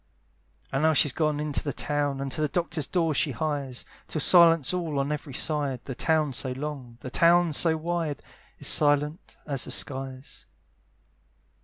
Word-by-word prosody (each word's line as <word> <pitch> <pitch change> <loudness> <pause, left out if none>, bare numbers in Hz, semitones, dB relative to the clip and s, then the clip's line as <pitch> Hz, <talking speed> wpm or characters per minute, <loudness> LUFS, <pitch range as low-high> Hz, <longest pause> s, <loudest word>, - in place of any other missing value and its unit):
And 135 - -1
now 160 0 +3
she's 145 -2 +3
got 155 -3 -1
into 150 -2 -2
the 145 - -2
town, 145 -2 -2
And 135 -1 -4
to 155 - -3
the 150 - +2
doctor's 160 -2 -2
door 165 -4 0
she 150 - +1
hies; 140 -4 -3 0.2
Tis 155 - -2
silence 165 -4 +5
all 165 -5 -3
on 140 +1 -1
every 150 -3 -5
side; 145 -5 0
The 135 - -5
town 155 +1 0
so 130 +1 -1
long, 135 -4 -7
the 130 - -8
town 170 0 +3
so 160 +2 +5
wide, 165 -3 -3 0.3
Is - - -1
silent 150 +2 +2
as 140 -4 -2
the - - -9
skies. 135 -1 -3
150 Hz, 170 wpm, -26 LUFS, 135-160 Hz, 0.3 s, silence